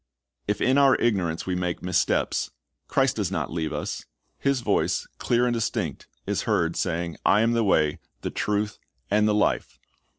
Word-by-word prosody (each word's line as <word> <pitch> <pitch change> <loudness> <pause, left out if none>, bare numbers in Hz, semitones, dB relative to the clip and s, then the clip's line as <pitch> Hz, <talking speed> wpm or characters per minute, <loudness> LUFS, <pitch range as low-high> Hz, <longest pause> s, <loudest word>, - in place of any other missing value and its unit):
If 105 - -1
in 130 +2 +4
our 135 -2 +6
ignorance 90 -8 0
we 95 - -1
make 90 -1 -2
missteps, 90 -1 +1 0.4
Christ - - +2
does - - 0
not - - -3
leave 80 -2 -2
us. - - -4 0.3
His 140 -2 +1
voice, - - +1
clear 120 0 +2
and 120 - +1
distinct, 115 -2 -2 0.2
is - - -1
heard 85 0 +2
saying, 85 -2 -2
"I 105 - +4
am 115 +1 +3
the 115 -1 +2
Way, 75 -7 +2 0.2
the - - -3
Truth, 105 0 -1 0.3
and 105 +1 +4
the 105 - +2
Life." 105 - 0
105 Hz, 170 wpm, -25 LUFS, 85-115 Hz, 0.4 s, our